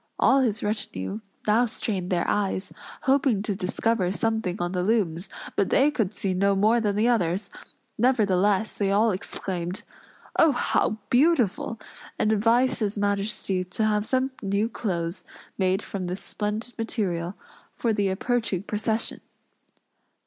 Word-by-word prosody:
All 270 Hz, -, +5 dB
his 225 Hz, -4 st, 0 dB
retinue 205 Hz, -, -3 dB, 0.3 s
now 225 Hz, +3 st, +4 dB
strained 195 Hz, -5 st, -2 dB
their 175 Hz, -2 st, 0 dB
eyes, 195 Hz, -2 st, -1 dB, 0.3 s
hoping 265 Hz, -6 st, +2 dB
to 210 Hz, -, -1 dB
discover 190 Hz, 0 st, 0 dB
something 220 Hz, -2 st, -1 dB
on 175 Hz, 0 st, -1 dB
the 180 Hz, -1 st, -1 dB
looms, 185 Hz, -3 st, 0 dB, 0.3 s
but 195 Hz, -, +1 dB
they 285 Hz, +3 st, +4 dB
could 220 Hz, -9 st, 0 dB
see 195 Hz, -3 st, -2 dB
no 200 Hz, +2 st, +2 dB
more 220 Hz, +4 st, +3 dB
than 205 Hz, -2 st, 0 dB
the 215 Hz, +3 st, +2 dB
others; 195 Hz, -5 st, +1 dB, 0.5 s
nevertheless, 210 Hz, -4 st, +2 dB
they 200 Hz, -2 st, +2 dB
all 215 Hz, +3 st, +3 dB
exclaimed, 185 Hz, -1 st, -4 dB, 0.6 s
"Oh, 320 Hz, -3 st, +6 dB
how 220 Hz, -3 st, +1 dB
beautiful!" 245 Hz, -, +2 dB, 0.4 s
and 215 Hz, -, +2 dB
advised 230 Hz, +4 st, +3 dB
his 210 Hz, -2 st, -1 dB
majesty 200 Hz, -2 st, 0 dB
to 185 Hz, +4 st, -1 dB
have 210 Hz, 0 st, +1 dB
some 260 Hz, +1 st, +1 dB
new 200 Hz, +2 st, 0 dB
clothes 175 Hz, -6 st, -3 dB, 0.3 s
made 190 Hz, +1 st, +1 dB
from 185 Hz, -3 st, -4 dB
this 180 Hz, +2 st, -4 dB
splendid 215 Hz, +3 st, -3 dB
material, 190 Hz, -6 st, -2 dB, 0.4 s
for 230 Hz, -2 st, -1 dB
the 205 Hz, -2 st, +1 dB
approaching 205 Hz, -1 st, -1 dB
procession. 220 Hz, +2 st, -1 dB
210 Hz, 140 wpm, -26 LUFS, 190-225 Hz, 0.6 s, Oh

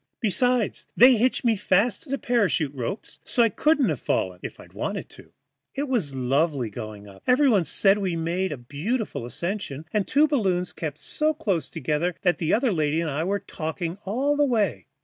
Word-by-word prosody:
Besides 245 Hz, +2 st, +1 dB
they 250 Hz, +1 st, +8 dB
hitched 250 Hz, +3 st, +1 dB
me 230 Hz, -2 st, +4 dB
fast 200 Hz, +3 st, +1 dB
to 305 Hz, -, -9 dB
the 275 Hz, -, 0 dB
parachute 200 Hz, -, +1 dB
ropes 135 Hz, -, -5 dB
so 240 Hz, -, +2 dB
I 230 Hz, -, +4 dB
couldn't 295 Hz, +3 st, +2 dB
have 150 Hz, -6 st, -2 dB
fallen 90 Hz, -1 st, -1 dB
if -, -, -8 dB
I'd -, -, -15 dB
wanted -, -, -4 dB
to. -, -, -15 dB, 0.4 s
It 285 Hz, +2 st, -2 dB
was 200 Hz, -, -1 dB
lovely 135 Hz, -1 st, 0 dB
going 105 Hz, 0 st, -8 dB
up; 95 Hz, -1 st, -14 dB
everybody 250 Hz, -, +4 dB
said 195 Hz, +6 st, +4 dB
we 185 Hz, -4 st, -1 dB
made 170 Hz, +3 st, -1 dB
a 145 Hz, -, -4 dB
beautiful 145 Hz, -, -3 dB
ascension, 165 Hz, -, -4 dB
and 210 Hz, -2 st, +2 dB
the -, -, -15 dB
two 295 Hz, +3 st, +4 dB
balloons 190 Hz, -11 st, 0 dB
kept 150 Hz, -3 st, -5 dB
so 310 Hz, -, 0 dB
close 195 Hz, -, -1 dB
together 160 Hz, +3 st, -1 dB
that 180 Hz, -2 st, +2 dB
the 160 Hz, -, 0 dB
other 240 Hz, +2 st, +2 dB
lady 155 Hz, -3 st, 0 dB
and 165 Hz, -3 st, -2 dB
I 150 Hz, +3 st, -1 dB
were 200 Hz, +2 st, -1 dB
talking 170 Hz, +2 st, -5 dB
all 260 Hz, +9 st, 0 dB
the 290 Hz, -, +3 dB
way. 205 Hz, -, 0 dB
185 Hz, 195 wpm, -25 LUFS, 150-240 Hz, 0.4 s, they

